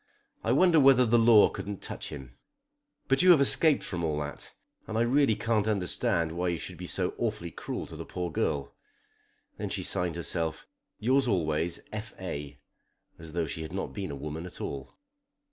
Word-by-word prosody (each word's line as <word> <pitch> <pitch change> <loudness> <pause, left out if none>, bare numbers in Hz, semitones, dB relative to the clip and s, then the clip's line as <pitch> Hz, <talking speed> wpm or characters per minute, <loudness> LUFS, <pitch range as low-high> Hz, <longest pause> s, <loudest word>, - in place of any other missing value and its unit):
I 115 - +1
wonder 165 +4 +5
whether 135 -2 +6
the 120 +1 +4
law 115 -2 +7
couldn't 100 -1 -6
touch - - -5
him! 65 -4 -9 0.7
But 135 +3 +3
you 185 - +5
have 170 -5 +8
escaped 145 +2 +5
from 85 -2 -4
all 75 -2 -1
that, 75 0 -7 0.4
and 110 - -3
I - - +2
really 125 -1 +3
can't 110 -2 0
understand 90 -5 0
why 90 +2 -2
you 85 -1 0
should - - -8
be - - -7
so - - +1
awfully - - -2
cruel - - -5
to - - -11
the - - -6
poor 90 -2 -4
girl." 70 -2 -1 0.9
Then - - -3
she - - -3
signed 90 -2 0
herself 85 -1 -2 0.3
"Yours 130 +4 +2
always, 85 -4 0
F. 110 +2 -6
A." 75 -6 -6 0.6
as 80 -1 -10
though 85 -1 0
she 80 - -5
had 80 +2 -7
not 95 - -4
been 100 -4 -4
a 70 - -5
woman 75 +5 -6
at - - -11
all. 70 -1 -6
90 Hz, 190 wpm, -28 LUFS, 80-120 Hz, 0.9 s, have